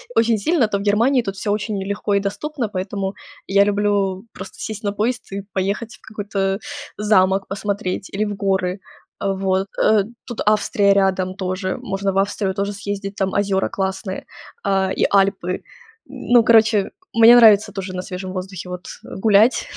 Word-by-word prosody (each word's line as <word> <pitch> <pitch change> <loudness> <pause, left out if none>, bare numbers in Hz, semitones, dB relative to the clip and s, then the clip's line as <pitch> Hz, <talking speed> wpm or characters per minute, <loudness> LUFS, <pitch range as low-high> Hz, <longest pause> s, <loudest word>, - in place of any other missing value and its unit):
очень 225 -1 +3
сильно, 290 - +2
то 205 - -1
в - - -5
Германии 230 +6 +3
тут 195 -3 -5
всё 205 - -2
очень 210 -1 -2
легко 200 0 -1
и - - +4
доступно. 225 +7 -3
Поэтому 195 0 -3 0.3
я 200 +1 +5
люблю 200 -1 0
просто - - -10
сесть 220 0 -5
на 205 - 0
поезд 230 +4 -2
и 200 +1 -4
поехать 205 +4 -2
в - - -24
какой-то 200 -2 -2 0.4
замок 195 -2 +3
посмотреть 195 -1 -3
или 210 +2 0
в 205 -1 -3
горы. 190 -1 -1 0.4
Э, 195 -1 +1
вот. 190 0 0 0.2
Э, 215 -2 +4 0.2
тут 240 - -6
Австрия 205 -1 +3
рядом 190 -1 +1
тоже. 185 0 -3
Можно 195 0 -2
в - - -2
Австрию 195 0 0
тоже 200 +1 -2
съездить. 200 0 -5
Там 190 -1 -1
озёра 195 -1 +1
классные, 190 0 -3 0.4
а, 190 -1 +1
и - - +1
Альпы. 195 -2 +1 0.5
Ну, 240 -1 +3
короче, 220 -3 +4 0.2
мне 230 +1 +8
нравится 215 -3 +6
тоже 195 -2 -5
на 180 - -2
свежем 185 -1 -6
воздухе, 185 -1 -6
вот, 180 0 -7 0.2
гулять, 215 +4 +3
200 Hz, 165 wpm, -20 LUFS, 190-210 Hz, 0.5 s, мне